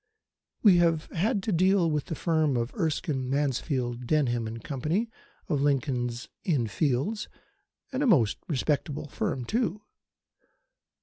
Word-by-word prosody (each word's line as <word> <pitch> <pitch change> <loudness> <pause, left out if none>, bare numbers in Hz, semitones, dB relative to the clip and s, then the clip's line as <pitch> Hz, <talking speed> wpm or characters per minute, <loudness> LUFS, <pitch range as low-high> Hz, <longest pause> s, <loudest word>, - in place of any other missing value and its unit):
We 195 -5 +7
have 165 -2 +3
had 200 +4 0
to 215 - -1
deal 185 0 +3
with 150 -2 -1
the 165 - -4
firm 155 -5 +1
of 115 +1 -2
Erskine, 155 - -1
Mansfield, 130 -3 -1
Denham 120 -6 0
& - - -15
Co., 135 +2 -5 0.7
of 150 -7 0
Lincoln's 130 -4 0 0.2
Inn 145 -10 +1
Fields: 145 - -1 0.6
and 260 +1 -2
a 290 - +2
most 125 - +4
respectable 145 0 -1
firm 125 -2 -2
too. 215 - -1
150 Hz, 130 wpm, -28 LUFS, 125-175 Hz, 0.7 s, We